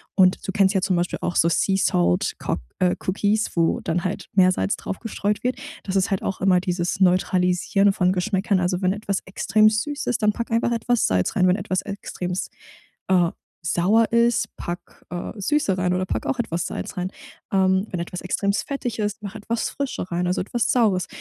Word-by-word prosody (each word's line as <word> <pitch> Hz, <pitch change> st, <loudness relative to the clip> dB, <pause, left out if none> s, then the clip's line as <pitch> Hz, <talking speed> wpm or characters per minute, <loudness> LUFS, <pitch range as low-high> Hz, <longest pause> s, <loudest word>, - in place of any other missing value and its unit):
und 185 Hz, -1 st, +4 dB
du -, -, -2 dB
kennst 195 Hz, 0 st, +3 dB
ja 190 Hz, -, +1 dB
zum 190 Hz, 0 st, +1 dB
Beispiel 175 Hz, 0 st, -1 dB
auch 175 Hz, -, -2 dB
so 165 Hz, -, +4 dB
Sea 190 Hz, +3 st, +2 dB
Salt 90 Hz, -, +2 dB
kok -, -, -2 dB, 0.2 s
äh, 180 Hz, -1 st, +3 dB
Cookies, 205 Hz, +3 st, +1 dB
wo 165 Hz, -1 st, +2 dB
dann 170 Hz, +1 st, -2 dB
halt 185 Hz, -, -3 dB
Meersalz 185 Hz, -, +3 dB
drauf 195 Hz, -, -6 dB
gestreut 210 Hz, -2 st, -2 dB
wird. 250 Hz, +1 st, 0 dB, 0.3 s
Das 195 Hz, -, -4 dB
ist 195 Hz, +2 st, +2 dB
halt 195 Hz, -2 st, -1 dB
auch 195 Hz, -, -3 dB
immer 185 Hz, -1 st, +4 dB
dieses 180 Hz, 0 st, -2 dB
Neutralisieren 185 Hz, +2 st, +3 dB
von 180 Hz, -1 st, +2 dB
Geschmäckern. 190 Hz, +1 st, +1 dB
Also, 180 Hz, +1 st, 0 dB
wenn 185 Hz, 0 st, +2 dB
etwas 200 Hz, -2 st, -2 dB
extrem 215 Hz, +2 st, +3 dB
süß 260 Hz, +7 st, -2 dB
ist, 245 Hz, -, 0 dB
dann 210 Hz, 0 st, +4 dB
pack 235 Hz, +2 st, -4 dB
einfach 230 Hz, +1 st, +1 dB
etwas 235 Hz, 0 st, +1 dB
Salz 90 Hz, -1 st, +1 dB
rein, 185 Hz, -1 st, +4 dB
wenn 180 Hz, -, +4 dB
etwas 185 Hz, -1 st, -2 dB
extremst, 185 Hz, -2 st, -4 dB, 0.6 s
äh, 175 Hz, -2 st, +4 dB, 0.3 s
sauer 205 Hz, +8 st, +3 dB
ist, 235 Hz, -1 st, +2 dB
pack, 175 Hz, 0 st, -7 dB
äh, 175 Hz, 0 st, -5 dB
Süße 200 Hz, -3 st, +1 dB
rein 180 Hz, -1 st, +1 dB
oder 185 Hz, +1 st, 0 dB
pack -, -, -3 dB
auch 270 Hz, -, -1 dB
etwas 175 Hz, -8 st, -2 dB
Salz -, -, -5 dB
rein. 180 Hz, +1 st, -2 dB, 0.4 s
Ähm, 190 Hz, +1 st, +3 dB
wenn 180 Hz, -, -2 dB
etwas 180 Hz, +1 st, -5 dB
extremst 200 Hz, +2 st, -1 dB
fettig 245 Hz, -5 st, -3 dB
ist, 210 Hz, +1 st, -2 dB
mach 200 Hz, +1 st, -6 dB
etwas 225 Hz, +2 st, -2 dB
Frische 265 Hz, -10 st, -4 dB
rein, 175 Hz, +1 st, 0 dB
also 180 Hz, +2 st, 0 dB
etwas 225 Hz, +5 st, -1 dB
Saures. 205 Hz, -7 st, +2 dB
190 Hz, 200 wpm, -23 LUFS, 180-215 Hz, 0.6 s, und